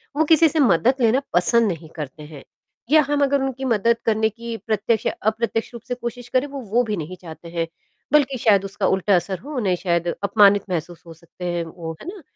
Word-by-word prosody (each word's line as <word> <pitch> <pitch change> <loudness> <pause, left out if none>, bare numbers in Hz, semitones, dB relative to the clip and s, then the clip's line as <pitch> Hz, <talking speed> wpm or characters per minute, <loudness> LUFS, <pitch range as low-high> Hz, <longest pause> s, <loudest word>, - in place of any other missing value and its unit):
वो 315 - +3
किसी 320 +1 +5
से 315 - -1
मदद 240 - +4
लेना 240 +4 +3
पसंद 225 +6 +3
नहीं 165 -1 -8
करते 150 -1 -7
हैं 150 -2 -11 0.5
या 310 0 +7
हम 290 0 +1
अगर 280 0 +2
उनकी 265 0 -3
मदद 230 -1 +2
करने 220 -1 +2
की 230 +1 -7
प्रत्यक्ष 220 0 0
या - - +1 0.2
अप्रत्यक्ष 225 +1 -3
रूप 235 - -8
से 245 - -2
कोशिश 245 0 -6
करें 255 +3 +1
वो, 280 -1 -7
वो 235 +2 +1
भी 215 -3 -3
नहीं 170 +3 -6
चाहते 170 0 -10
हैं। 165 -1 -2 0.5
बल्कि 275 -3 +3
शायद 200 -4 +3
उसका 195 0 -2
उल्टा 190 +1 +2
असर 180 +1 -1
हो, 290 - -8
उन्हें 195 -7 +1
शायद 170 -1 -1 0.2
अपमानित 200 -1 +5
महसूस 175 -1 -4
हो 165 - -10
सकते 170 +2 -11
हैं 175 -1 -1
वो। 165 0 -7
है - - -10
ना? 375 0 -7
215 Hz, 220 wpm, -22 LUFS, 175-250 Hz, 0.5 s, या